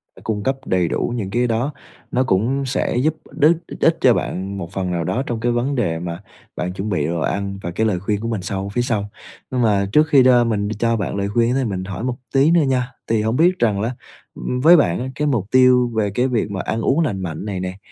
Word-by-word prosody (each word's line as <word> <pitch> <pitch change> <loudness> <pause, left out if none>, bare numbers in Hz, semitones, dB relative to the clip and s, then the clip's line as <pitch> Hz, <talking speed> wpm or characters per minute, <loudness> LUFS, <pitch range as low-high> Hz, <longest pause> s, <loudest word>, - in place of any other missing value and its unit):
ờ, - - -15
cung 105 -2 -2
cấp 135 - +1
đầy 90 -2 +1
đủ 120 - -1
những 105 -5 -3
cái 120 +4 +1
đó. 120 +6 -1 0.4
Nó 125 - +2
cũng 130 +5 0
sẽ 130 -2 -1
giúp 150 +5 +1 0.2
đích 155 +3 +3 0.2
ích - - +4
cho - - +6
bạn 95 +2 -3
một 85 -2 -6
phần 95 -2 -2
nào 85 -1 -1
đó 125 +10 -1
trong 120 -2 -2
cái 120 +2 0
vấn 120 +4 0
đề 90 -10 0
mà 85 0 -5 0.4
bạn 90 +1 -3
chuẩn 95 +3 -4
bị 75 -7 0
đồ 85 +1 -2
ăn 100 +3 -2
và 85 - -3
cái 110 +6 0
lời 95 -4 0
khuyên 100 +2 -1
của 115 - -4
mình 110 -4 -2
sau 95 +2 -4
phía 120 +4 -1
sau. 110 -5 -1 0.4
Mà 110 -6 +2
trước 150 +6 +4
khi 140 -4 +5
đo 125 -1 +5
mình 105 -3 -1
cho 115 0 +2
bạn 100 -2 -3
lời 100 0 -1
khuyên 120 +3 +1
mình 95 -2 -3
ấy, - - -6
hỏi 95 - -5
một 125 -1 -1 0.2
tí 140 +4 +4
nữa 170 -1 +5
nha, 130 -2 0 0.2
thì 110 -1 +1
hông 110 +2 0
biết 175 +5 +3
rằng 105 -4 +2
lá, 120 +3 -2 0.4
ừm, 125 - -3
với 170 +5 +8
bạn 90 - +2
á 125 - -3
cái 150 +2 -1
mục 120 -9 0
tiêu 125 -1 +5
về 105 -2 +1
cái 125 +6 +1
việc 115 -5 -1
mà 95 -1 -3
ăn 115 - -2
uống 135 +7 +2
lành 125 -13 0
mạnh 85 +1 -5
này 100 -3 -3
nè, 90 +1 -4
115 Hz, 260 wpm, -20 LUFS, 100-130 Hz, 0.4 s, với